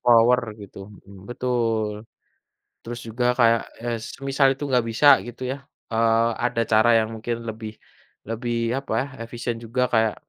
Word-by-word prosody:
power 120 +1 +5 0.2
gitu, 100 -1 -12 0.3
mhm, 100 +1 -14
betul. 115 -4 -1 0.8
Terus 120 +1 -7
juga 120 +2 -2
kayak, 115 -1 +5 0.2
eee, 120 -1 -1
semisal 135 +3 0
itu 145 - -6
nggak 125 -3 +2
bisa 115 +6 +3 0.2
gitu 120 +1 -10
ya, 135 - -4 0.4
eee, 115 0 +3 0.2
ada 115 -1 0
cara 110 +2 +5
yang 110 -1 +1
mungkin 115 +1 -4
lebih 110 0 -7 0.5
lebih 120 +1 -2 0.2
apa 135 - -10
ya, - - -2 0.2
efisien 120 -1 -4
juga 120 +2 -2
kayak, 110 -2 +3
115 Hz, 150 wpm, -23 LUFS, 110-120 Hz, 0.8 s, power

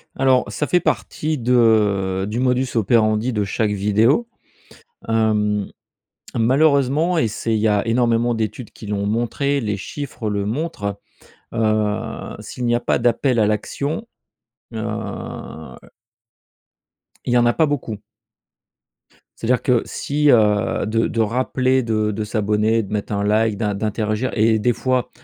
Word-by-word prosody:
Alors, 130 -1 +3
ça 150 - -2
fait 180 - +3
partie 155 -2 -2
de 105 -6 +2
du 110 +3 -2
modus 130 +1 +1
operandi 110 +2 +2
de 105 -2 0
chaque 105 +2 -1
vidéo. 110 - +2 0.8
Hem, 105 -2 +1 0.7
malheureusement, 140 +6 +3
et 135 - +2
c'est 110 +1 -3
il - - +1
y 110 - +1
a 105 0 +2
énormément 120 0 +2
d'études 115 +1 -4
qui 110 - -12
l'ont 100 -1 -2
montré, 120 +6 0
les 105 -3 -2
chiffres 120 +1 -5
le 100 -1 -1
montrent. 105 -6 -3 0.5
Heu, 110 -2 -1
s'il 125 - -6
n'y 120 0 +2
a - - +1
pas - - 0
d'appel 120 +1 +2
à 105 - +3
l'action, 140 - -2 0.7
heu 110 - -4 2.5
il 120 - 0
y 125 - +5
en 120 - +4
a 120 - +3
pas 160 - +3
beaucoup 130 -7 -3 1.4
ça 115 - -4
veut 125 - +4
dire 125 - 0
que 125 -3 +2
si, 150 +1 0
heu, 105 -1 +2
de 115 +1 +1
de 115 - -1
rappeler 130 +3 +1
de 110 -2 0
de 110 +1 -3
s'abonner, 105 +1 +1
de 100 - -7
mettre 105 0 -3
un 100 0 -1
like, 110 0 +2
d'in 105 -1 -1
d'interagir 105 +3 -2
et 110 0 +3
des 120 +3 +2
fois 130 +1 -1
115 Hz, 150 wpm, -20 LUFS, 105-125 Hz, 2.5 s, y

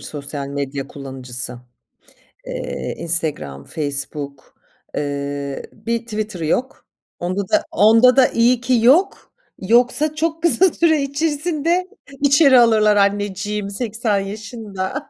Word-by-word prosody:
sosyal 140 -1 -6
medya 140 -1 -4
kullanıcısı. 130 -2 -6 0.9
Eee, - - -5
Instagram, 155 - -2
Facebook, 140 -2 -5 0.4
eee, 140 -1 -4
bir 230 +2 -3
Twitter'ı 215 -6 -4
yok. 245 +12 -2 0.3
Onda 185 +3 -2
da, - - +2
onda 225 +6 +5
da, 265 -1 +6
iyi 235 +1 +2
ki 245 0 +2
yok. 335 +10 +3 0.3
Yoksa 245 +9 +2
çok 325 +1 -2
kısa 345 +1 +4
süre 315 -3 +2
içerisinde 315 +4 -1 0.3
içeri 280 -2 +6
alırlar 215 -3 +4
anneciğimi 205 0 0
80 220 -1 -1
yaşında. 210 +4 -6
210 Hz, 105 wpm, -20 LUFS, -, 0.9 s, da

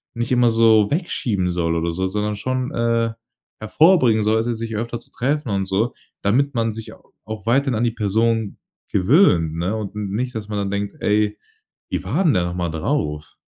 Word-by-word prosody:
nicht 120 +1 -3
immer 125 -1 +4
so 110 -2 +5
wegschieben 115 - -1
soll 85 -1 0
oder 85 +1 -1
so, 95 +3 -1
sondern 105 +2 -2
schon, 130 +4 -2
äh, 115 -1 +1 0.5
hervorbringen 120 - +4
sollte, 110 +2 +1
sich 115 0 -5
öfter 115 +2 -3
zu - - -18
treffen 140 +1 -1
und 95 -1 0
so, 100 +5 0 0.3
damit 135 +7 +1
man 115 -1 0
sich 110 0 -8
au - - -21
auch 110 -2 -7
weiterhin 130 +2 +2
an 110 - 0
die 120 - +2
Person 110 0 0 0.3
gewöhnt, 90 - +3
ne? 90 +6 -1
U 110 - -3
und 100 0 -7 0.2
nicht, 125 +5 -2
dass 110 -2 -5
man 105 -1 -4
dann 100 -1 -2
denkt: 100 0 -3
„Ey, 105 0 +1 0.5
wie 90 -1 -2
war 130 - 0
denn 165 - +4
der 90 -4 +1
nochmal 90 -1 -2
drauf?" 75 -1 -2
110 Hz, 190 wpm, -21 LUFS, 95-120 Hz, 0.5 s, so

